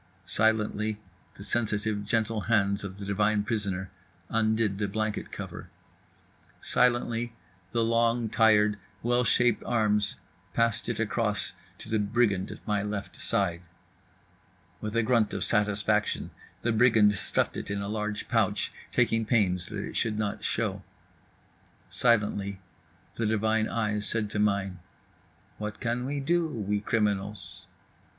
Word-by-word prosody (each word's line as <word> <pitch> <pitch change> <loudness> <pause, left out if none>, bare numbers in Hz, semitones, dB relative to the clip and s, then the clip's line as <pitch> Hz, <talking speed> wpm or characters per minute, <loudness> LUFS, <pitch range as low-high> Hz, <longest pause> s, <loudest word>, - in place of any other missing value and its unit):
Silently 110 -1 +1 0.4
the 100 - -10
sensitive, 105 -2 0
gentle 110 0 0
hands 100 -2 +1
of 100 -1 -6
the 100 - -7
divine 105 +1 +2
prisoner 100 -4 -2 0.4
undid 110 -2 +1
the 105 - 0
blanket 110 +1 -2
cover. - - -7 0.9
Silently 120 -1 +1 0.4
the 115 -1 +1
long, 115 0 +2
tired, 110 -2 +4 0.2
well 120 +1 +3
shaped 120 0 +3
arms 105 -3 +1 0.4
passed 115 -1 +1
it 115 - -2
across 110 -2 -1 0.2
to - - -10
the 110 -1 +1
brigand 105 -2 +1
at - - -10
my 105 -1 +1
left 105 -1 -4
side. 85 -4 0 1.2
With 105 +1 -4
a 115 - +3
grunt 115 -3 +2
of 95 - -1
satisfaction 105 0 +1 0.3
the 120 - +2
brigand 110 -2 +5
stuffed 100 - 0
it - - -5
in 100 0 -1
a - - -4
large 105 0 -3
pouch, 105 -4 +1 0.2
taking 115 0 +2
pains 95 -6 +1
that - - -4
it - - -8
should 110 -2 0
not 105 -2 -2
show. - - -1 1.1
Silently 105 -4 +1 0.6
the 115 - 0
divine 110 0 +1
eyes 105 -2 0
said 110 -2 -1
to 105 - -2
mine: 100 -3 +1 0.8
"What 105 -1 -5
can 120 +1 -1
we 145 +1 -2
do, 170 +4 +1
we 105 -8 -2
criminals?" 105 -1 -2
105 Hz, 135 wpm, -28 LUFS, 105-115 Hz, 1.2 s, brigand